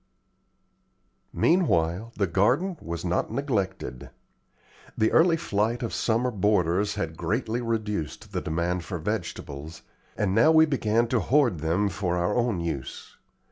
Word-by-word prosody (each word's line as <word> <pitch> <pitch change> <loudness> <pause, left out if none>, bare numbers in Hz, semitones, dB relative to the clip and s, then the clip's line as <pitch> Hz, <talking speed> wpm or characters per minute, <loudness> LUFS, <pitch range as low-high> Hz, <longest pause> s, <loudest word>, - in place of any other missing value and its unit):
Meanwhile 110 - +1
the 100 - +2
garden 125 - +1
was 85 +1 -5
not 90 +1 0
neglected. 100 - -3 0.9
The 110 - +2
early 165 0 +4
flight 115 -4 -1
of 115 - -3
summer 120 +2 +1
boarders 100 -1 +1
had 80 -6 -3
greatly 110 +8 -2
reduced 105 - -3
the - - -2
demand 85 +2 -1
for 90 - -5
vegetables, 75 -1 -5 0.3
and 100 -3 0
now 115 +9 +5
we 160 0 +6
began 115 -5 +1
to 125 - +2
hoard 120 - +2
them 85 +6 +1
for 90 -2 -2
our 90 +3 0
own 120 -7 0
use. 70 -6 -5
105 Hz, 135 wpm, -26 LUFS, 85-120 Hz, 0.9 s, we